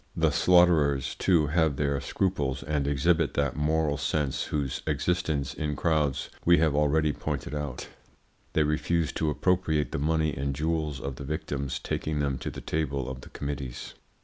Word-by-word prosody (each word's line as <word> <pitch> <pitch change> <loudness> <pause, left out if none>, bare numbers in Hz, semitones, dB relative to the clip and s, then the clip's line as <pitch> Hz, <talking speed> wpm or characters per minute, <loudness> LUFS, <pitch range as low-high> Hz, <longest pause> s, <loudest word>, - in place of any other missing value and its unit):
The - - +3
slaughterers, 80 -7 +4
too, 85 -5 +3
have 80 -1 +2
their 70 -1 0
scruples 70 -8 -1
and 70 0 -1
exhibit 80 +3 +2
that 70 -3 0
moral 75 0 +1
sense 75 -1 -1
whose 70 -3 -2
existence 80 -7 0
in 75 +1 -2
crowds 75 -4 0
we 85 0 +6
have 80 -2 +3
already 75 +1 +2
pointed - - -4
out. 75 -4 -4 0.7
They 80 - +3
refuse 80 +2 0
to 80 - -1
appropriate 80 -2 +1
the - - -2
money 80 0 +1
and 70 +1 -2
jewels 75 -1 -1
of 70 -2 -5
the - - -7
victims, 70 -2 -3
taking 75 +3 -3
them 70 -3 -1
to - - -4
the - - -8
table 70 -4 -2
of 65 -1 -6
the - - -12
committees. 70 -4 -5
75 Hz, 165 wpm, -28 LUFS, 70-80 Hz, 0.7 s, we